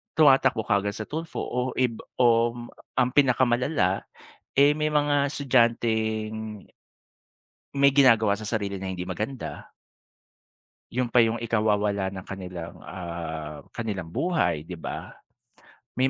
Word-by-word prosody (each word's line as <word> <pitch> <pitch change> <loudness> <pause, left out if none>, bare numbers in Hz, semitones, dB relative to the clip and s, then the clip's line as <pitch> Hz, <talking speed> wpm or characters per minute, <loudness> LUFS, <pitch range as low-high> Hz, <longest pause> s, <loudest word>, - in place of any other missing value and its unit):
tuma-takbo 135 -7 +5
kaagad 100 -1 +1
sa 110 - -5
Tulfo 160 +2 -4
o 125 +1 -2
ib 125 -3 +1 0.2
om 120 0 +2 0.3
ang 125 -1 +3
pinaka-malala, 125 - +2 0.5
eh, 145 +1 +6
may 155 0 0
mga 145 -1 +2
estudyanteng 110 -5 0 1.1
may 140 0 +5
gina-gawa 115 -7 +4
sa 110 - -7
sarili 100 -3 -2
na 95 - -6
hindi 90 -1 -5
maganda. 110 +8 -5 1.2
Yun 125 0 0
pa 120 0 +5
yung 115 0 -1
ikawawala 105 -4 +1
ng 95 -1 -8
kanilang, 90 -3 -7
ah, 80 -4 -6
kanilang 100 -7 -4
buhay, 90 - 0
di 90 - -7
ba? 80 - -6 0.8
May 130 +2 +2
115 Hz, 120 wpm, -26 LUFS, 100-130 Hz, 1.2 s, eh